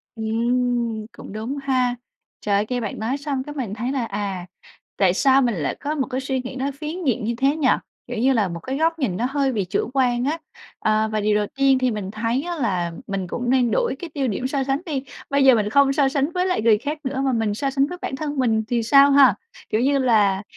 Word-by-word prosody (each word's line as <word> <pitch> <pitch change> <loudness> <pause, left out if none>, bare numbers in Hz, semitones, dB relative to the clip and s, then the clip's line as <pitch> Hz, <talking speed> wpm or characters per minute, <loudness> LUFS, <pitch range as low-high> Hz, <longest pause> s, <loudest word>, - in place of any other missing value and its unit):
Ừm, 235 0 0
cũng - - -10
đúng 225 +6 -4
ha. 255 -2 +1 0.5
Trời, 205 0 +1
nghe 250 -1 -1
bạn 215 - -4
nói 235 +6 -1
xong 280 -2 -3
cái 295 +2 -8
mình 245 -8 -3
thấy 235 +4 -3
là, 265 -4 -1
à, 200 -4 -4 0.5
tại 185 -3 +3
sao 270 +7 +4
mình 240 -4 +1
lại 150 -6 -2
có 295 +2 -3
một 270 -3 -1
cái 260 0 -3
suy 265 -1 -2
nghĩ 255 +1 -7
nó 270 +1 -2
phiến 320 +4 -5
diện 250 -5 +1
như 235 +2 -1
thế 275 +3 +2
nhỉ, 305 -4 +1 0.4
kiểu 245 - -5
như 260 +4 +3
là 215 -5 +2
một 170 -1 -6
cái 260 +10 -4
góc 325 +1 +1
nhìn 210 - -1
nó 235 - 0
hơi 275 -1 +1
bị 210 -6 -1
chủ 195 +5 -2
quan 250 -2 +1
á. 305 +4 0 0.4
Ờ, 215 0 +1
và 215 - 0
điều 210 0 +2
đầu 210 0 +1
tiên 270 -1 +4
thì 255 -1 +1
mình 205 -3 -4
thấy 230 +5 -1
á 350 0 -3
là 185 - -1 0.2
mình 195 -2 -3
cũng 245 +7 -3
nên 250 -2 +3
đổi 480 -1 +1
cái 345 - -6
tiêu 275 -2 -1
điểm 245 +3 -2
so 270 0 -1
sánh 270 +2 -1
đi, 285 -6 -3 0.3
bây 280 0 +2
giờ 260 -2 +8
mình 210 -2 0
không 275 +3 +4
so 275 -1 +3
sánh 280 +3 0
với 360 +1 0
lại 365 -8 0
người 220 -1 +5
khác 290 +7 -4
nữa 265 0 -2
mà 265 - +2
mình 225 -3 0
so 275 +6 -1
sánh 275 +1 +1
với 360 - -7
bản - - -3
thân 290 +1 -4
mình 225 -4 +2
thì 235 -1 0
sao 275 +5 +6
ha? 275 -1 +6 0.3
Kiểu 215 - +1
như 280 +2 +3
là, 210 -6 +3
255 Hz, 255 wpm, -22 LUFS, 220-275 Hz, 0.5 s, giờ